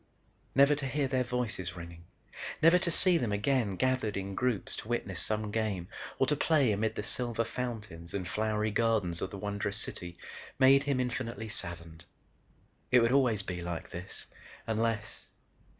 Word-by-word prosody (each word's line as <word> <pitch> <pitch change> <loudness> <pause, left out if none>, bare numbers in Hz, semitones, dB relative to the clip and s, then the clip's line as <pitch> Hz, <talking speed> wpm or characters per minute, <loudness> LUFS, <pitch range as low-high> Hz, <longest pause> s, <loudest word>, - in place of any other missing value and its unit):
Never 140 +2 +7
to 145 -2 -2
hear 140 +1 0
their 130 -1 +1
voices 120 -8 -3
ringing, 85 -1 -9 0.5
never 165 +3 +6
to 175 - -1
see 175 +1 +3
them 120 -4 -1
again 105 0 +1
gathered 130 -3 +1
in 95 0 -3
groups 125 -1 0
to - - -7
witness 105 -6 -1
some 105 -1 -1
game 105 -5 -1 0.3
or - - +4
to 150 +2 +2
play 145 -5 +3
amid 110 +2 0
the - - -3
silver 115 +2 0
fountains 105 -9 -5
and 95 -3 -2
flowery 110 +1 0
gardens 105 -6 +1
of 95 - -2
the 100 - -7
wondrous 100 0 -2
city, 90 -5 -4 0.4
made 135 +1 +6
him 140 -2 +1
infinitely 115 -3 -2
saddened. 85 -5 -6 0.8
It 125 - +6
would 115 +1 +3
always 125 -6 +3
be 90 -2 -4
like 85 -1 -5
this, 90 +3 -4 0.4
unless.... 110 -1 -1
110 Hz, 165 wpm, -31 LUFS, 95-125 Hz, 0.8 s, Never